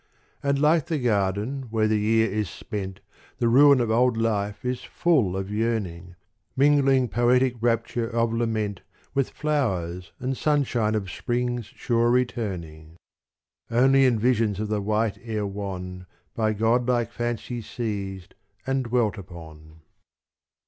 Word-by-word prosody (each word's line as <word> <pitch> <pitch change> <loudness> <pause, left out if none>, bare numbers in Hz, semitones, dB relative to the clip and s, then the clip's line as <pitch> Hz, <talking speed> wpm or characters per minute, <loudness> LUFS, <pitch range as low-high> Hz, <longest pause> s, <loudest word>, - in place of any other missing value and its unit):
And 140 0 +1
like 150 +1 +3
the 160 - -1
garden 110 +2 -1
where 110 -1 +1
the 110 0 +1
year 110 +1 +3
is 105 -2 -2
spent, 95 -2 -6 0.4
The 120 - +1
ruin 140 +3 +6
of 115 -2 0
old 120 +1 +3
life 105 -1 -1
is 125 0 -2
full 130 - +1
of 95 +1 -4
yearning. 100 -6 -2 0.4
Mingling 135 -2 +4
poetic 120 +4 +2
rapture 115 0 0
of 115 -1 0
lament 110 -4 -1 0.3
With 135 -2 +1
flowers 95 - -2
and 130 +1 -2
sunshine 125 -7 +1
of 95 -4 -3
spring's 120 -2 -2
sure 120 +1 0
returning 90 -11 -2 0.7
Only 135 +3 +4
in 125 -3 +3
visions 110 -3 +1
of 105 -1 -3
the 105 -1 0
white 105 +1 0
air 110 -3 -3
wan 90 -2 -6 0.3
By 110 -1 0
godlike 120 +2 +1
fancy 120 0 -3
seized 100 -5 -5 0.3
and 135 -1 0
dwelt 115 -4 0
upon. 80 -3 -12
115 Hz, 135 wpm, -25 LUFS, 100-125 Hz, 0.7 s, ruin